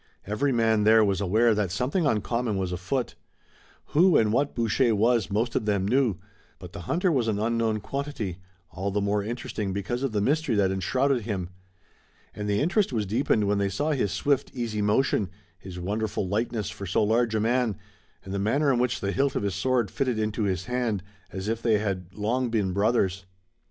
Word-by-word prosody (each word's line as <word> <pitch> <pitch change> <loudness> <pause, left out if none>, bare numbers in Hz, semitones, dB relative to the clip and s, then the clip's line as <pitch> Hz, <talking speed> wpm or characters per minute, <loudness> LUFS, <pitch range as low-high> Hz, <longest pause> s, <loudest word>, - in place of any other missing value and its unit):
Every 110 +8 0
man 115 -3 +2
there 110 0 +6
was 100 -1 0
aware 110 +5 +3
that 105 -3 0
something 135 - 0
uncommon 115 -1 0
was 95 -2 -2
afoot. 95 +8 -2 0.8
Who 175 +3 +5
and 110 -1 +2
what 140 +4 +1
Boucher 115 0 +2
was 115 +1 +2
most 115 +4 -1
of 110 - 0
them 100 -2 +1
knew, 120 -4 +2 0.4
but - - -11
the - - -7
hunter 180 +1 +2
was 125 -7 +1
an 110 -2 0
unknown 110 0 0
quantity, 125 -8 -4 0.3
all 95 +4 -3
the 100 +1 0
more 100 0 0
interesting 110 -3 -4
because 100 +6 -3
of 135 -3 -1
the 105 - 0
mystery 145 +3 +1
that 100 -2 +2
enshrouded 125 +8 +1
him. 95 -5 -3 0.8
And 105 0 -4
the 100 +3 +1
interest 190 +5 +1
was 110 -4 -1
deepened 110 +1 +1
when 100 0 +1
they 100 0 +1
saw 145 +11 -1
his 125 -10 0
swift, 140 - 0
easy 115 -4 -2
motion, 105 -1 +1 0.3
his 95 -1 -9
wonderful 105 +1 -2
lightness 110 +1 -2
for 100 - -7
so 90 - +2
large 115 +1 +2
a - - +2
man, 120 -1 +1 0.5
and 95 - -6
the 100 - -1
manner 135 +8 +2
in 120 - +1
which 125 0 0
the 100 - -1
hilt 135 +4 0
of - - -1
his 100 -2 -1
sword 120 +1 0
fitted 130 -4 -1
into 110 0 -1
his 95 -2 -1
hand, 120 -6 -1 0.3
as 95 +2 -5
if 115 +1 -1
they 110 -2 +3
had 95 -4 -3
long 120 +4 0
been 105 -5 0
brothers. 95 -2 +1
110 Hz, 195 wpm, -26 LUFS, 100-125 Hz, 0.8 s, there